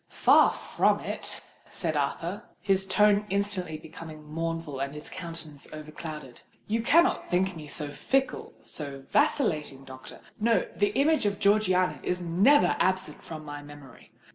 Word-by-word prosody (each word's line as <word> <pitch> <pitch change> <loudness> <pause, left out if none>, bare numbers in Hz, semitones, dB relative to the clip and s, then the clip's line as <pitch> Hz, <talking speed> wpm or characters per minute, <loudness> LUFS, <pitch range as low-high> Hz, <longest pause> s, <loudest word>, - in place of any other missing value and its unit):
"Far - - +5
from - - +1
it!" - - -4 0.3
said 165 -4 -3
Arthur, 170 +8 -2
his 195 -1 +1
tone 210 +1 +4
instantly 195 -5 -1
becoming 155 0 -10
mournful 165 -2 -4
and 140 +1 -3
his 150 - -8
countenance 165 -5 -8
overclouded. 155 -3 -8 0.2
"You 225 +2 0
cannot 335 +10 +3
think 185 +1 +1
me 155 -2 -8
so 150 0 -4
fickle—so 145 - -3
vacillating, 155 - +1
doctor. 130 -1 -11 0.2
No: 230 +2 +3
the 205 0 +2
image 305 -5 +3
of 200 -1 -1
Georgiana 195 -3 +2
is 180 - -1
never 190 +12 +4
absent 185 0 0
from 155 -1 -8
my 145 0 -7
memory. 145 -3 -14
170 Hz, 140 wpm, -28 LUFS, 150-205 Hz, 0.3 s, Far